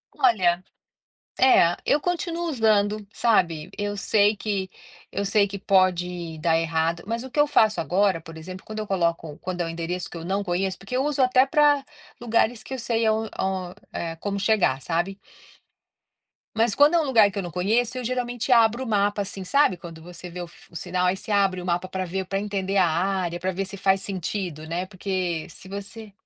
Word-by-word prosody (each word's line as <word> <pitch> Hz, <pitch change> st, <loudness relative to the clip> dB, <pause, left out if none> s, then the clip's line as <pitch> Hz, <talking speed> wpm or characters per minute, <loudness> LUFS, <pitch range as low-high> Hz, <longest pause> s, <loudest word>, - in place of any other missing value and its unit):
Olha, 185 Hz, -8 st, +3 dB, 0.8 s
é, 175 Hz, -10 st, +5 dB
eu 295 Hz, -, +3 dB
continuo 345 Hz, -1 st, -2 dB
usando, 215 Hz, -4 st, +2 dB
sabe? 170 Hz, -9 st, +1 dB
Eu 205 Hz, 0 st, -2 dB
sei 210 Hz, +1 st, +3 dB
que 195 Hz, -2 st, -3 dB, 0.4 s
eu 200 Hz, -, -2 dB
sei 200 Hz, 0 st, +3 dB
que 200 Hz, 0 st, -6 dB
pode 180 Hz, -3 st, +1 dB
dar 165 Hz, 0 st, +2 dB
errado, 165 Hz, +1 st, 0 dB
mas 230 Hz, +3 st, -3 dB
o 260 Hz, -, -8 dB
que 295 Hz, -, -3 dB
eu 295 Hz, -, +5 dB
faço 220 Hz, -6 st, +3 dB
agora, 185 Hz, +1 st, +2 dB
por 165 Hz, 0 st, -11 dB
exemplo, 185 Hz, +3 st, -9 dB
quando 215 Hz, 0 st, -6 dB
eu 215 Hz, -, -4 dB
coloco 170 Hz, -5 st, -1 dB
quando 180 Hz, -1 st, -4 dB
é -, -, 0 dB
um -, -, -4 dB
endereço 170 Hz, 0 st, -4 dB
que 170 Hz, -, -8 dB
eu 165 Hz, -, -7 dB
não 195 Hz, +2 st, -1 dB
conheço 185 Hz, +1 st, -1 dB
porque 195 Hz, +6 st, -6 dB
eu 265 Hz, -, +1 dB
uso 290 Hz, -2 st, 0 dB
até 255 Hz, +1 st, +5 dB
para 290 Hz, 0 st, +3 dB, 0.4 s
lugares 230 Hz, -1 st, +1 dB
que 265 Hz, -, -8 dB
eu 260 Hz, -, -4 dB
sei 230 Hz, -1 st, 0 dB
aon 220 Hz, 0 st, +1 dB
on 185 Hz, -2 st, -2 dB, 0.2 s
eh, 165 Hz, -1 st, -4 dB
como 200 Hz, +2 st, -3 dB
chegar, 190 Hz, -11 st, +2 dB
sabe? 175 Hz, +6 st, -2 dB, 1.4 s
Mas 225 Hz, -1 st, +2 dB
quando 295 Hz, +4 st, +5 dB
é -, -, +5 dB
um -, -, +1 dB
lugar 225 Hz, -6 st, +5 dB
que 200 Hz, -, -9 dB
eu 195 Hz, -, -1 dB
não 175 Hz, -, -6 dB
conheço, 225 Hz, +8 st, 0 dB
eu 250 Hz, -, -3 dB
geralmente 245 Hz, 0 st, -2 dB
abro 235 Hz, +1 st, +4 dB
o -, -, -6 dB
mapa 205 Hz, -1 st, +1 dB
assim, 195 Hz, -1 st, -5 dB
sabe 190 Hz, -3 st, +3 dB
quando 165 Hz, -2 st, -10 dB
você 175 Hz, +1 st, -10 dB
vê 180 Hz, +1 st, -7 dB
o 175 Hz, -, -6 dB
f 175 Hz, -, -19 dB
o -, -, -17 dB
sinal, 180 Hz, +2 st, -1 dB
aí 180 Hz, +1 st, +2 dB
você 210 Hz, -, -7 dB
abre 195 Hz, -3 st, +2 dB
o -, -, -8 dB
mapa 175 Hz, +1 st, -1 dB
para 185 Hz, 0 st, -3 dB
ver, 190 Hz, +2 st, -3 dB
para 195 Hz, +1 st, -2 dB
entender 200 Hz, -1 st, -2 dB
a 180 Hz, -2 st, +5 dB
área, 175 Hz, +1 st, -1 dB
para 185 Hz, +1 st, -1 dB
ver 195 Hz, +2 st, -3 dB
se 200 Hz, +1 st, -6 dB
faz 195 Hz, 0 st, +2 dB
sentido, 180 Hz, -4 st, -4 dB
né, 175 Hz, +3 st, -2 dB
porque 185 Hz, -4 st, -3 dB
se -, -, -13 dB
você 200 Hz, +2 st, -7 dB
195 Hz, 210 wpm, -24 LUFS, 175-220 Hz, 1.4 s, é